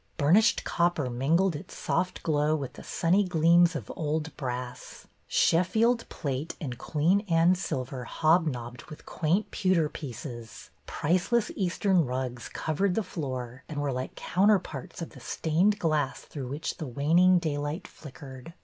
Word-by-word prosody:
Burnished 190 +11 +4
copper 170 -7 0
mingled 160 +9 +2
its 155 +5 -9
soft 185 0 -1
glow 150 -1 +2
with 140 -4 -4
the - - -11
sunny 185 +5 +2
gleams 170 -1 +4
of 125 -10 -5
old 155 0 -2
brass; 125 -2 -6 0.2
Sheffield 225 +8 +2
plate 140 +1 -4
and 125 -6 -5
Queen 165 +6 +2
Anne 165 +2 +5
silver 130 -8 -4
hobnobbed 135 -7 0
with 155 - -12
quaint 175 +7 0
pewter 180 -5 +2
pieces; 120 -5 -8 0.2
priceless 185 +8 +1
Eastern 185 -1 +2
rugs 125 -2 -4
covered 180 +4 -1
the 225 - +1
floor 130 -7 -5
and 150 -2 -4
were 145 -1 -1
like 130 0 -4
counterparts 185 -6 0
of - - -8
the - - -13
stained 180 +6 +1
glass 155 -7 0
through 135 -4 -7
which 145 +5 -4
the 155 - -5
waning 165 +8 +4
daylight 150 -1 -2
flickered. 135 +1 -11
155 Hz, 140 wpm, -28 LUFS, 135-180 Hz, 0.2 s, Anne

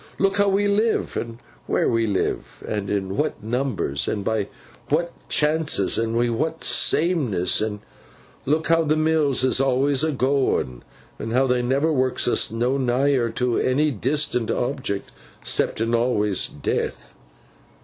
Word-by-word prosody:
Look 195 0 +1
how 200 0 +3
we 200 +1 +2
live, 215 +3 +1
an' 115 -1 -4 0.3
wheer - - +1
we 115 -1 +1
live, 100 -2 -2
an' 105 -2 -3
in 95 -1 -2
what 150 -7 -2
numbers, 110 - -2
an' 105 -2 -2
by 110 -1 -1 0.4
what 170 +3 +1 0.2
chances, 150 -10 +1
and 115 0 -1
wi' 120 0 +2
what 160 +8 -2
sameness; 130 - +2
and 105 -1 -3 0.7
look 155 +3 +1
how 165 0 +4
the 155 -1 +1
mills 155 -4 +2
is 130 0 +3
awlus 135 +1 +2
a 160 - +1
goin, 130 - 0 0.4
and 115 - -4
how 130 +2 +3
they 125 -1 +1
never 140 +6 +1
works 130 -2 +1
us - - +2
no 120 +4 0
nigher 130 -1 +1
to 125 -2 0
ony 145 +4 +2
dis'ant 130 0 -1
object—ceptin 115 -2 -2
awlus, 105 -5 +1
Death. 70 - -4
130 Hz, 145 wpm, -23 LUFS, 115-150 Hz, 0.7 s, how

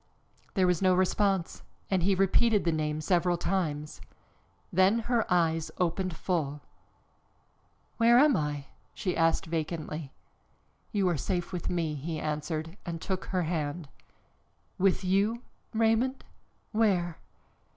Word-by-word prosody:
There 190 -2 +4
was 180 -1 +2
no 185 -1 +4
response 190 -1 +1 0.3
and 190 -2 +2
he 195 +3 +3
repeated 200 +3 +3
the 170 - +3
name 155 -1 -1
several 175 +2 +2
times. 155 -5 -2 0.7
Then 190 +5 +4
her 230 -2 0
eyes 165 -2 +2
opened 180 0 -1
full. 150 -5 -2 1.4
"Where 235 +1 +6
am 285 0 +6
I?" 145 -2 -2 0.3
she 185 -3 -2
asked 165 0 +2
vacantly. 155 -2 -4 0.8
"You 200 -3 +1
are 175 -3 +1
safe, 175 +5 -2
with 180 - -3
me," 165 -3 -1
he 155 +2 -4
answered 155 +3 -3
and 170 -1 -5
took 190 +2 -3
her 185 -2 -1
hand. 155 -2 -3 0.9
"With 190 +1 +2
you, 200 +6 +1 0.3
Raymond? 225 +4 +1 0.5
Where?" 190 -7 +1
180 Hz, 125 wpm, -29 LUFS, 160-195 Hz, 1.4 s, Where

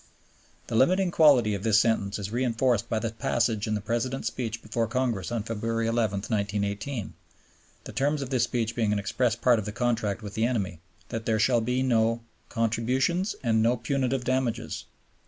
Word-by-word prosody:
The - - -4
limiting 180 +9 +3
quality 135 -10 +5
of 100 - -3
this 110 0 +4
sentence 105 -4 +1
is 100 -1 -5
reinforced 120 -1 +1
by 110 - 0
the 115 0 -2
passage 115 -1 0
in 110 - 0
the 105 - -3
President's 120 +5 -1
speech 115 -2 -5
before 115 +1 -1
Congress 120 -4 -1
on 115 -3 -1
February 115 +1 -2
11, 110 -4 0
1918 105 +2 -2 0.7
(the - - -8
terms 145 +1 0
of 130 - -8
this 125 -3 +2
speech 115 -2 -2
being 110 -3 +1
an 105 - +1
express 110 +3 0
part 120 -1 +3
of 105 - -5
the 105 - -4
contract 110 -2 -1
with 105 -1 -7
the 110 +1 +1
enemy), 100 -9 -2 0.3
that 115 0 -4
there 110 -1 +2
shall 120 +2 +3
be 125 +3 0
"no 115 -2 +2 0.3
contributions" 125 - 0
and 110 -2 +2
"no 120 +3 +3
punitive 135 -2 -1
damages." 125 -3 -1
115 Hz, 180 wpm, -27 LUFS, 110-125 Hz, 0.7 s, quality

